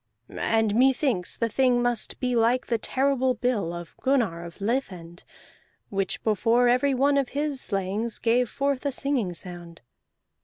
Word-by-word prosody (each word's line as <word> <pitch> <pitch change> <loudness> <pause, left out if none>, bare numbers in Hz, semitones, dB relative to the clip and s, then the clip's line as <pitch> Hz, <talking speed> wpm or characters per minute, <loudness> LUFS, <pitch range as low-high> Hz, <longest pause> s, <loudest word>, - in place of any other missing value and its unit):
And 220 -2 0
methinks 255 - +2
the 230 - 0
thing 250 +1 +2
must 245 -2 -1
be 250 -2 0
like 235 +2 +2
the 230 -2 -1
terrible 260 +1 +1
bill 225 -8 -1
of 170 -1 -8
Gunnar 235 -11 +1
of 170 -1 -10
Lithend, 190 -7 -3 0.7
which 195 -1 -2
before 230 +3 +2
every 255 +3 +3
one 280 +2 +3
of 270 - -2
his 290 -2 -1
slayings 200 +3 -2
gave 240 +1 +1
forth 275 -1 -1
a - - 0
singing 250 -10 -1
sound. 170 -1 -9
235 Hz, 150 wpm, -26 LUFS, 195-260 Hz, 0.7 s, every